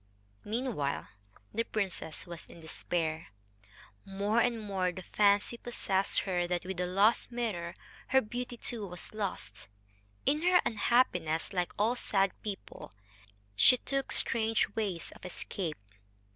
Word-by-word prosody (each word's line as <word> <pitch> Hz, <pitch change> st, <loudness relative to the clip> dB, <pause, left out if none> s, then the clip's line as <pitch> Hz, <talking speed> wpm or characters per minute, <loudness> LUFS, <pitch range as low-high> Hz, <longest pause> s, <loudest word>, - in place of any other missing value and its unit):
Meanwhile 220 Hz, -, -2 dB, 0.4 s
the 230 Hz, -, +1 dB
princess 190 Hz, -8 st, -3 dB
was 170 Hz, -2 st, -8 dB
in -, -, -13 dB
despair. 160 Hz, 0 st, -2 dB, 0.8 s
More 200 Hz, +4 st, +1 dB
and 235 Hz, -1 st, +1 dB
more 195 Hz, -4 st, 0 dB
the 185 Hz, +1 st, -8 dB
fancy 205 Hz, +4 st, +3 dB
possessed 195 Hz, -5 st, 0 dB
her 175 Hz, -2 st, 0 dB
that 175 Hz, 0 st, -1 dB
with 190 Hz, 0 st, -4 dB
the 180 Hz, 0 st, 0 dB
lost 200 Hz, +7 st, +3 dB
mirror 195 Hz, -8 st, -2 dB, 0.3 s
her 265 Hz, -, +5 dB
beauty 245 Hz, +1 st, -4 dB
too 225 Hz, -3 st, -1 dB
was 180 Hz, +2 st, -5 dB
lost. 180 Hz, -, -4 dB, 0.6 s
In 300 Hz, +2 st, +2 dB
her 360 Hz, +1 st, +5 dB
unhappiness, 205 Hz, -8 st, +2 dB
like 180 Hz, -2 st, 0 dB
all 225 Hz, +4 st, +3 dB
sad 195 Hz, -5 st, +2 dB
people, 200 Hz, -, -7 dB, 0.6 s
she 250 Hz, -, +7 dB
took 275 Hz, +1 st, -2 dB
strange 225 Hz, -1 st, +3 dB
ways 195 Hz, -7 st, -2 dB
of -, -, -15 dB
escape. 180 Hz, -2 st, -4 dB
200 Hz, 130 wpm, -32 LUFS, 175-230 Hz, 0.8 s, she